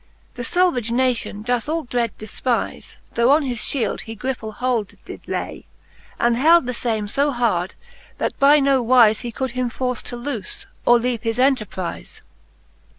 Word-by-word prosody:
The 245 Hz, -, -6 dB
falvage 300 Hz, -6 st, +1 dB
nation 235 Hz, -4 st, 0 dB
doth 245 Hz, +3 st, -1 dB
all 325 Hz, +1 st, -1 dB
dread 240 Hz, -3 st, -2 dB
defpize. 230 Hz, +3 st, -3 dB, 0.2 s
Tho 235 Hz, +1 st, +3 dB
on 295 Hz, +2 st, +5 dB
his 250 Hz, -4 st, -2 dB
fliield 230 Hz, -5 st, 0 dB
he 225 Hz, -, -8 dB
griple 225 Hz, -1 st, -4 dB
hold 240 Hz, -5 st, -1 dB
did -, -, -9 dB
lay, -, -, -4 dB, 0.5 s
And 235 Hz, 0 st, +3 dB
held 320 Hz, +4 st, +5 dB
the 250 Hz, -, -2 dB
fame 225 Hz, -3 st, -2 dB
fb 280 Hz, +7 st, 0 dB
hard, 195 Hz, -7 st, 0 dB, 0.4 s
that -, -, -2 dB
by 285 Hz, +2 st, +6 dB
no 275 Hz, -2 st, +3 dB
wize 230 Hz, -3 st, +5 dB
He 240 Hz, -, -5 dB
could 260 Hz, +3 st, -3 dB
him 250 Hz, 0 st, -1 dB
force 250 Hz, 0 st, -2 dB
to 245 Hz, -, -5 dB
loofe, 240 Hz, -5 st, -5 dB, 0.2 s
or 240 Hz, -, +7 dB
leave 235 Hz, -1 st, -1 dB
his 225 Hz, 0 st, -2 dB
enterprize. 240 Hz, -9 st, -1 dB
245 Hz, 165 wpm, -21 LUFS, 225-260 Hz, 0.5 s, or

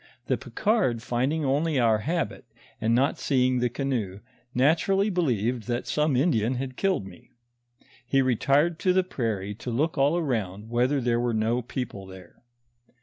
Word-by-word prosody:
The -, -, +1 dB
Picard 200 Hz, -, 0 dB
finding 135 Hz, +6 st, 0 dB
only 145 Hz, +3 st, +1 dB
our 115 Hz, -3 st, +3 dB
habit, 165 Hz, +9 st, -2 dB, 0.4 s
and 115 Hz, +1 st, +2 dB
not 135 Hz, +3 st, +1 dB
seeing 130 Hz, -2 st, +2 dB
the 120 Hz, 0 st, +1 dB
canoe, 115 Hz, -7 st, -3 dB, 0.3 s
naturally 170 Hz, -, +2 dB
believed 125 Hz, -, 0 dB
that 120 Hz, +1 st, -2 dB
some 150 Hz, -2 st, +1 dB
Indian 125 Hz, -4 st, +2 dB
had 130 Hz, 0 st, -4 dB
killed 190 Hz, -, 0 dB
me. 90 Hz, -3 st, -14 dB, 0.7 s
He 135 Hz, -1 st, +2 dB
retired 140 Hz, +7 st, +2 dB
to 185 Hz, 0 st, +2 dB
the 185 Hz, 0 st, +3 dB
prairie 110 Hz, -, -3 dB
to 115 Hz, +4 st, -7 dB
look 145 Hz, +6 st, 0 dB
all 145 Hz, +5 st, +3 dB
around 110 Hz, -, -3 dB
whether 125 Hz, +4 st, +1 dB
there 120 Hz, -1 st, +1 dB
were 120 Hz, -1 st, 0 dB
no 115 Hz, +3 st, +1 dB
people 115 Hz, -5 st, -6 dB
there. 95 Hz, -2 st, -14 dB
125 Hz, 155 wpm, -26 LUFS, 115-150 Hz, 0.7 s, our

